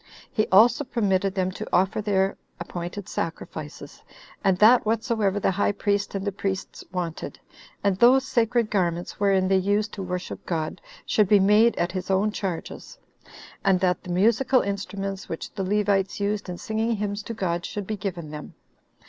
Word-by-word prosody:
He 215 - +1
also 235 +7 +5
permitted 195 -6 0
them 185 -1 0
to - - -7
offer 195 +4 +2
their 195 -2 +1 0.2
appointed 175 +3 -6
sacrifices, 165 - -6 0.4
and 190 -2 +3
that 225 +5 +6
whatsoever 220 -2 0
the 195 - +1
high 205 +2 +1
priest 205 0 -1
and 195 0 -3
the 200 - 0
priests 195 0 -4
wanted, 175 -3 -4 0.4
and 200 -2 +2
those 255 +4 +5
sacred 235 -2 +1
garments 175 -3 -1
wherein 195 -2 +3
they 190 0 +3
used 205 +3 0
to 195 - -6
worship 180 -1 -5
God, 165 0 -3 0.2
should 210 -2 +3
be 205 +1 +6
made 210 +4 +5
at 175 - -1
his 185 0 -5
own 195 +2 +2
charges; 190 -5 -5 0.7
and 190 -2 +3
that 180 -1 +1
the 185 - -11
musical 230 +8 +3
instruments 195 -1 -4
which 165 - -6
the 195 - -3
Levites 200 0 +1
used 205 -1 -2
in 175 - -5
singing 220 +3 -1
hymns 205 0 -3
to 230 +2 -7
God 175 -3 -1
should 205 +2 -5
be 215 - -3
given 175 -6 -5
them. 150 -1 -8
195 Hz, 170 wpm, -25 LUFS, 185-210 Hz, 0.7 s, that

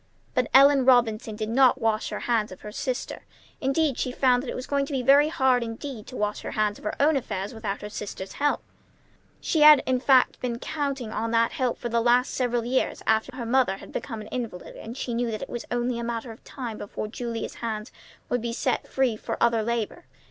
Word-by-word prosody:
But 250 - +1
Ellen 275 0 +7
Robinson 230 -4 +3
did 215 0 -4
not 260 +2 +4
wash 225 -2 0
her - - -5
hands 225 -4 0
of 185 - -11
her 210 - -8
sister. 255 +3 -4 0.4
Instead, 275 0 +1
she 255 - -1
found 250 -1 +3
that 255 - -6
it - - -4
was 255 - -5
going 280 -1 0
to 285 - -6
be 260 -2 -1
very 280 +3 +6
hard 265 -5 +2
indeed 230 0 -6
to 255 - -8
wash 210 0 -1
her - - -5
hands 210 -1 0
of - - -15
her 210 - -3
own 300 +2 +4
affairs 205 -5 -3
without 210 -3 -4
her 210 - -5
sister's 195 -2 -6
help. 290 0 0 0.8
She 320 - 0
had, 300 -2 +9
in 255 -1 +1
fact, 260 0 +4
been 240 -2 -2
counting 275 -4 -3
on 225 +1 -2
that 230 0 +2
help 255 -2 -1
for 240 - -4
the 235 0 +1
last 245 +2 +3
several 245 -2 0
years, 255 +2 -1
after 220 +4 +1
her 245 -2 -5
mother 240 -5 +2
became 225 -5 -5
an - - -9
invalid 230 -8 -5
and 230 +3 -8
she 245 - -3
knew 235 0 0
that 215 -1 -4
it - - -8
was 240 - -5
only 240 0 -1
a - - -3
matter 235 0 -4
of 225 - -14
time 240 -5 -6
before 205 - -5
Julia's 230 +1 -5
hands 220 -1 -4 0.4
would 245 - -1
be 235 0 -3
set - - -1
free 260 -4 +1
for - - -5
other 235 -1 +3
labor. 235 +8 -3
240 Hz, 225 wpm, -26 LUFS, 225-260 Hz, 0.8 s, had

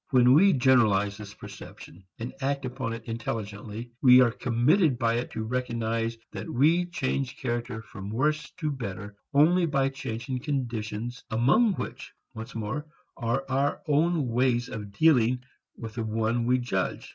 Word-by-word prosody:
When 125 -2 +5
we 190 +6 +6
generalize 110 -6 +3
this 100 -1 -10
perception 90 +4 -11
and 120 +2 -6
act 140 0 -1
upon 125 -2 -3
it 115 0 -7
intelligently 110 0 -5
we 125 -1 +8
are 125 -2 +5
committed 130 - +2
by 115 -1 +1
it 120 - -5
to 110 - -3
recognize 115 -1 -2
that - - -6
we 165 +8 +3
change 135 -6 -2
character 120 -2 -3
from 100 -2 -9
worse 150 +6 0
to 155 -1 -1
better 100 -6 -6 0.2
only 170 +5 +4
by 135 -3 +1
changing 130 0 -5
conditions 120 -3 -3
among 140 - +3
which, - - -6 0.2
once 115 +3 -8
more, 120 +8 -4 0.3
are 125 +3 -1
our 135 +2 0
own 155 0 +2
ways 120 0 +1
of 105 -2 -7
dealing 125 -1 +3 0.3
with 115 -2 -7
the 115 0 -3
one 115 +2 0
we 125 +1 +4
judge. 110 -7 -2
120 Hz, 155 wpm, -27 LUFS, 115-135 Hz, 0.3 s, we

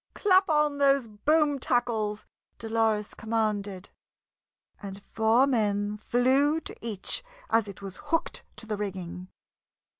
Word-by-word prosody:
"Clap 380 -2 +4
on 300 -2 +2
those 275 -2 +4
boom 290 +7 +1
tackles!" 225 -5 -1 0.3
Dolores 220 -2 0
commanded, 210 -4 -2 0.9
and 200 0 -8
four 225 +4 +4
men 210 -5 0
flew 265 +7 +2
to - - -7
each 220 - -2 0.3
as 225 -2 +3
it 200 0 -10
was 195 -2 -7
hooked 330 +1 -1
to - - -9
the 215 -1 -3
rigging. 185 -3 -5
225 Hz, 120 wpm, -27 LUFS, 205-275 Hz, 0.9 s, Clap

